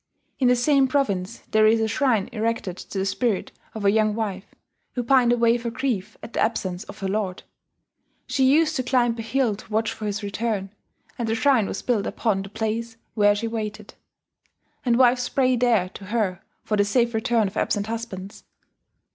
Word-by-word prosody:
In 260 - +3
the 250 - +5
same 270 +2 +3
province 225 -7 -1
there 215 0 +5
is 225 +1 +4
a 220 - +1
shrine 225 -3 +1
erected 225 -5 -2
to 195 - -8
the 190 - 0
spirit 210 0 -1 0.2
of 215 -2 -4
a 200 - +6
young 215 0 +2
wife, 205 -3 -4 0.4
who 245 - -2
pined 245 -1 +4
away 235 0 +3
for 235 0 -3
grief 230 -5 -3
at 235 - -9
the - - -2
absence 190 -4 -1
of - - -11
her 195 - -1
lord. 195 -2 -2 0.8
She 270 - 0
used 310 +1 +3
to - - +1
climb 245 -2 +2
a - - -1
hill 225 -1 0
to 205 - -14
watch 220 +1 0
for 215 - -5
his 205 +1 -3
return, 200 -1 -2 0.5
and 235 - -1
the 225 - +1
shrine 235 -3 +3
was - - -5
built 230 -5 0
upon 210 -5 0
the 195 - -8
place 225 +2 -3 0.2
where 205 -2 +4
she 230 +3 -2
waited; 215 -2 -5 0.9
and 240 -3 +2
wives 245 -1 +4
pray 255 -2 +2
there 230 -6 +2
to 195 - -11
her 200 -3 -1 0.2
for 215 - -1
the 205 - +4
safe 235 +3 +1
return 225 0 +1
of 190 - -8
absent 205 -1 0
husbands 215 -4 -6
225 Hz, 195 wpm, -24 LUFS, 205-240 Hz, 0.9 s, a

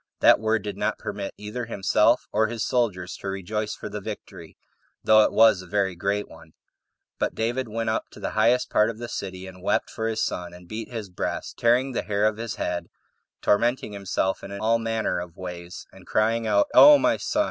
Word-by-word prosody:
That - - +7
word 110 -1 0
did 105 -2 -5
not - - -1
permit 100 - -5
either 105 +4 -5
himself 100 -4 +2
or 110 - +2
his 115 0 -3
soldiers 100 -8 -1
to - - -8
rejoice 100 +3 -3
for - - -7
the - - -6
victory, - - -9 0.5
though 110 0 +6
it - - +1
was 110 -4 +5
a 90 - -12
very 95 -1 0
great 100 +3 -1
one; 80 -1 -16 0.7
but - - -1
David 120 +3 -1
went 115 0 -2
up - - -1
to - - -12
the - - -3
highest 125 +2 +2
part 105 +1 +4
of 115 - -6
the 120 +1 -6
city, 95 -4 -6
19 95 -1 -10
and 90 - -16
wept 105 +3 0
for 110 -1 -3
his 110 0 -1
son, 90 0 -5
and 90 0 -14
beat 110 +3 -6
his 110 -5 -6
breast, 90 - -4
tearing 125 +3 +3
[the 125 - -1
hair 105 0 0
of] 110 -1 +1
his 115 -1 -4
head, 85 -1 -3 0.6
tormenting 120 +1 +1
himself 95 -1 -2 0.2
all 115 +1 +2
manner 115 -3 -1
of 85 -1 -8
ways, 90 -1 -8
and - - -17
crying 115 +1 +1
out, 100 -1 +4
"O 295 0 +10
my - - +2
son! - - -2
105 Hz, 210 wpm, -25 LUFS, 95-115 Hz, 0.7 s, O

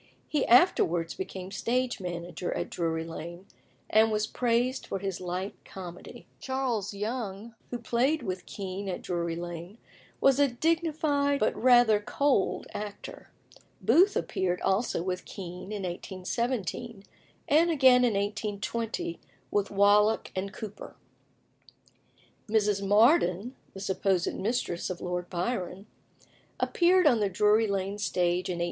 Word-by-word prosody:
He 295 -3 0
afterwards 175 - +4
became 190 0 -6
stage 245 +4 -1
manager 175 -1 -5
at - - -3
Drury 160 -1 -1
Lane, 170 +2 -8 0.4
and 220 +1 +4
was 215 0 +1
praised 245 +3 0
for - - -2
his 195 -1 -4
light 185 +2 -3
comedy. 180 -2 -10
Charles 255 -6 -2
Young, 210 0 -4 0.2
who 245 - -3
played 245 +6 0
with 185 -3 -4
Kean 195 0 -5
at 180 - -4
Drury 170 -2 -2
Lane, 175 +3 -7 0.4
was 275 0 +4
a 285 - +5
dignified 295 0 +1
but 215 - +1
rather 240 -4 +5
cold 270 +1 0
actor. 205 -1 -7 0.5
Booth 390 +4 +4
appeared 180 -1 -1
also 195 -2 0
with 185 0 -3
Kean 180 +1 -8
in 205 -2 -4
1817, 200 +4 -3 0.4
and 325 +4 +4
again 260 -5 +6
in 235 -4 +2
1820 210 - -3 0.3
with 205 -1 +1
Wallack 205 +2 +3
and 190 +1 -3
Cooper. 210 -1 -8 1.5
Mrs. 210 -2 +2
Mardyn 210 - +3 0.2
(the - - -7
supposed 190 -2 0
mistress 195 -5 -2
of 185 - -4
Lord 180 0 -4
Byron) 185 0 -3 0.7
appeared 360 +1 +3
on 250 -6 +5
the 205 -2 +1
Drury 210 +3 +3
Lane 200 0 -2
stage 180 -2 0
in - - 0
1815. - - -5
205 Hz, 130 wpm, -28 LUFS, 185-245 Hz, 1.5 s, again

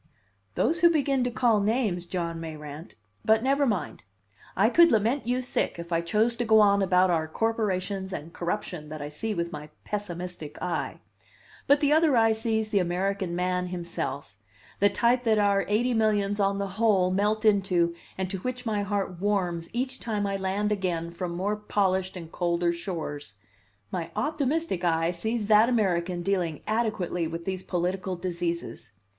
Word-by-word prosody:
"Those 325 +8 +1
who 345 -1 +7
begin 280 -5 +1
to - - +1
call 235 -3 +2
names, 205 -5 0
John 170 -2 -3
Mayrant 155 0 -8 0.3
but 220 +1 +3
never 275 +1 +2
mind! 205 -7 -2 0.6
I 200 +4 +5
could 335 +8 +6
lament 230 +4 +1
you 250 +1 0
sick 250 - -1
if 170 +1 -8
I 165 0 +2
chose 215 +7 +1
to 240 - 0
go 220 -1 +5
on 200 -1 +5
about 185 -1 +3
our 160 -2 +1
corporations 195 -1 -1
and 165 -1 -6
corruption 175 -3 -4
that 155 0 -6
I 145 0 -5
see 210 +9 -3
with 170 -1 -2
my 150 0 -7
pessimistic 180 -6 -5
eye; 180 - -3 0.7
but 285 +1 +5
the 290 0 +4
other 310 -4 +4
eye 225 -1 +5
sees 220 0 0
the 205 - +2
American 185 +1 -1
man 180 0 0
himself 170 - -5 0.4
the 205 - +5
type 240 +4 +2
that 225 -3 +2
our 200 -1 +3
eighty 240 +5 +1
millions 210 -2 +1
on 195 0 +2
the 200 0 -2
whole 195 -5 +4
melt 210 +3 +1
into 185 -5 +3 0.2
and 190 0 -1
to 195 - -3
which 250 +4 -4
my 215 -2 0
heart 200 -3 -2
warms 180 -5 0
each 255 +2 -2
time 210 -3 -2
I 200 0 -1
land 195 +2 -1
again 175 -5 -1
from 170 0 -4
more 200 +4 -1
polished 190 -3 0
and 165 -2 -9
colder 175 -1 +1
shores 160 - -5 0.6
my 170 -2 -3
optimistic 300 - -1
eye 165 -1 +2
sees 220 +5 -2
that 215 +2 +5
American 180 -6 0
dealing 180 -5 -1
adequately 215 -7 -1
with 165 +1 -6
these 185 -1 -3
political 185 +1 -2
diseases. 170 - -4
195 Hz, 170 wpm, -27 LUFS, 175-220 Hz, 0.7 s, who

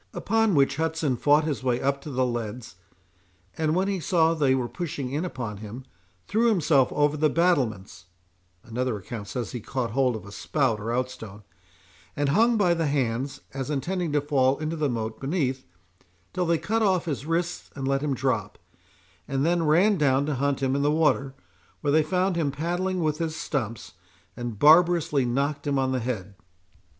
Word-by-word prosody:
Upon 225 -4 +1
which, 140 -1 +3
Hudson 160 -4 0
fought 145 +5 +3
his 150 -3 -2
way 125 -2 +1
up 140 +1 0
to 150 - -8
the 130 -2 0
leads; 120 -3 -4 0.8
and 155 0 0
when 190 +2 +1
he 195 -2 -1
saw 165 0 +2
they 140 -5 +2
were 125 -2 -1
pushing 140 -4 -5
in 150 +5 -1
upon 120 - -5
him, 110 +5 -9 0.4
threw 225 +3 +2
himself 155 - +3
over 145 0 +2
the 155 0 +2
battlements 120 - 0 0.6
(another 120 0 -2
account 100 +2 -7
says, 120 +2 -4
he 120 - -4
caught 120 0 -3
hold 130 0 +1
of 110 - -8
a 100 - -11
spout 115 +2 0
or 110 +2 -3
outstone,) 120 -5 -4 0.7
and 145 -1 0
hung 230 +9 +3
by 180 -5 +3
the 165 -2 0
hands, 135 -1 -1
as 135 0 -4
intending 165 +4 -2
to 145 - +2
fall 135 -2 +2
into 155 +1 -3
the 150 -3 0
moat 110 -2 -3
beneath, 135 - -2 0.7
till 180 -1 -1
they 170 0 +3
cut 210 +8 -1
off 185 -5 +2
his 145 -3 -4
wrists 170 +1 -2
and 135 -2 -4
let 135 0 +1
him 145 -2 -1
drop, 120 -7 -1 0.7
and 135 +1 0
then 170 +1 +2
ran 185 +6 +4
down 140 -1 +3
to 150 - -1
hunt 140 +1 -1
him 135 0 +1
in 140 - 0
the 145 - +2
water, 145 -3 +1 0.5
where 145 -2 +1
they 155 - +5
found 180 +4 0
him 160 -4 0
paddling 175 +5 -2
with 155 -1 0
his 160 -1 -2
stumps, 115 -9 -4 0.4
and 120 -3 -5
barbarously 160 - +5
knocked 140 +4 -1
him 140 -1 +1
on 130 -1 +1
the 130 - 0
head." 110 -5 -4
140 Hz, 185 wpm, -26 LUFS, 125-165 Hz, 0.8 s, they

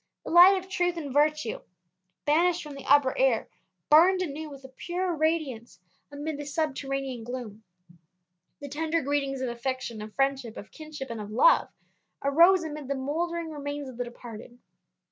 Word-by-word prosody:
The - - -5
light 360 +3 +8
of 375 0 -6
truth 355 -2 -1
and 285 -5 -5
virtue, 300 -3 +1 0.6
banished 340 +4 +2
from 300 -2 -9
the 275 -1 -10
upper 285 -2 +5
air, 255 -4 +2 0.4
burned 365 +5 +6
anew 310 -1 -5
with 275 -2 -12
a - - -9
purer 350 +6 -3
radiance 300 - -2 0.3
amid 290 +1 -5
this 290 -1 -7
subterranean 275 -5 -2
gloom. 230 -3 -7 1.0
The 285 - -6
tender 320 +3 -1
greetings 275 -1 -1
of 255 - -1
affection, 235 -2 -4
of 215 0 -9
friendship, 270 -4 -1
of 205 - -10
kinship, 305 -5 -8
and 225 -2 -5
of 205 - -7
love, 250 - +4 0.5
arose 340 +6 +5
amid 300 -3 -6
the 280 - -1
mouldering 325 +5 -3
remains 285 -1 -5
of 250 - -11
the 245 - -1
departed. 240 0 -11
285 Hz, 165 wpm, -27 LUFS, 260-320 Hz, 1.0 s, light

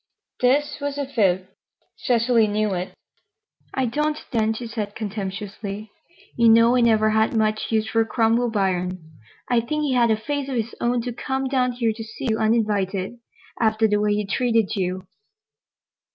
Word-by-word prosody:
This 275 +5 +2
was 285 0 -3
a 285 - -1
fib. 190 -8 +1 0.5
Cecily 235 -2 +2
knew 210 -1 0
it. 180 0 -4 0.8
"I 265 - +1
don't, 300 +5 -1
then," 220 -3 +1
she 225 +2 -5
said 215 -3 -5
contemptuously. 205 0 -5 0.4
"You 235 -1 +5
know 230 +2 +6
I 250 - +3
never 215 -2 +4
had 220 +1 +2
much 215 0 0
use 220 -1 +1
for 225 0 +2
Cromwell 230 +1 +1
Biron. 185 -4 0 0.5
I 245 -1 +3
think 300 +6 -2
he 280 -3 0
had 240 -2 +3
a 220 - +3
face 280 +4 -3
of 265 - -3
his 230 -1 -2
own 240 0 +1
to 245 0 -4
come 265 +3 -2
down 255 -2 +1
here 235 -2 0
to 225 +1 -7
see 220 +3 -5
you 220 - 0
uninvited, 210 -2 0 0.4
after 220 0 +3
the 210 -1 +1
way 210 0 +2
he 210 0 -1
treated 225 0 +1
you." 185 -1 -2
225 Hz, 170 wpm, -23 LUFS, 210-245 Hz, 0.8 s, know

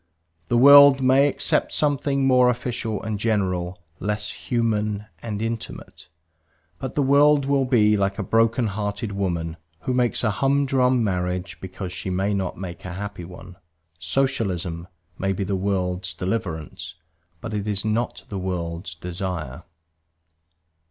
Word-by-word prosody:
The 120 - +2
world 140 +1 +8
may 135 +2 +5
accept 145 - +1
something 140 -2 +1
more 125 -1 +5
official 120 -3 -2
and 110 -2 -3
general, 90 -5 -1 0.2
less 105 +1 -2
human 105 -3 -1 0.2
and 110 -2 -4
intimate. 115 0 -6 0.7
But - - -5
the 145 - +2
world 140 +1 +4
will 140 -1 +2
be 110 -5 +4
like 100 -1 0
a 105 - -2
broken 115 +4 +2
hearted 105 0 -3
woman 85 -4 -2 0.2
who 130 - -2
makes 125 -1 +1
a 110 - +2
humdrum 130 0 +2
marriage 90 -2 -2
because 95 0 -6
she 95 +1 -4
may 95 +3 0
not 95 -2 -2
make 95 0 -7
a 90 - -6
happy 100 -2 -6
one; 90 +1 -12 0.4
Socialism 90 -5 -1 0.3
may 95 0 0
be 95 +1 -3
the 95 +1 -1
world's 90 -2 -2
deliverance, 80 -5 -4 0.4
but 110 +4 -6
it 105 0 -3
is 100 0 0
not 110 +3 -1
the 100 - -5
world's 85 -2 -4
desire. 85 -4 -5
105 Hz, 140 wpm, -23 LUFS, 90-120 Hz, 0.7 s, world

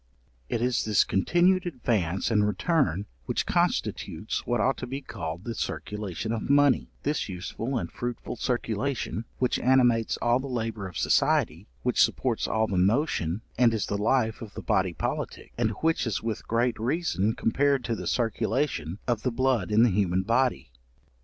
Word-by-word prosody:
It 115 - -1
is 125 -1 +1
this 105 -3 +4
continued 175 - +2
advance 110 - -1
and 105 -2 +3
return 105 - +1 0.2
which - - 0
constitutes - - -1
what 120 -1 +1
ought 130 +5 +2
to - - -5
be 135 +3 -4
called 85 - -6
the 115 - -4
circulation 105 +3 -4
of 115 +1 -3
money: 145 -2 +4
this 150 -6 -1
useful 110 +8 -4
and 85 -7 -4
fruitful 120 0 -5
circulation, 120 0 -2
which 125 - +1
animates 120 -3 +3
all 120 +1 +2
the 135 - -5
labour 115 -5 -3
of 90 - -8
society, - - +2 0.2
which - - +2
supports - - +1
all 110 0 +1
the 95 -4 -1
motion, 100 - +1 0.2
and 120 -2 +5
is 105 -4 -1
the 100 - -2
life 110 +1 +1
of 110 -3 -9
the - - -6
body 95 -2 +1
politic, - - -4
and 115 -2 +1
which 160 -5 +1
is 105 - -2
with 115 -2 -4
great 115 +1 +1
reason 115 - 0
compared 140 +3 +1
to 115 -1 -1
the - - -5
circulation 115 - -1
of 120 -3 0
the 125 - 0
blood 125 -5 +1
in 110 +2 +5
the 120 - +4
human 95 -1 +1
body. 120 - +1
115 Hz, 170 wpm, -27 LUFS, 100-130 Hz, 0.2 s, and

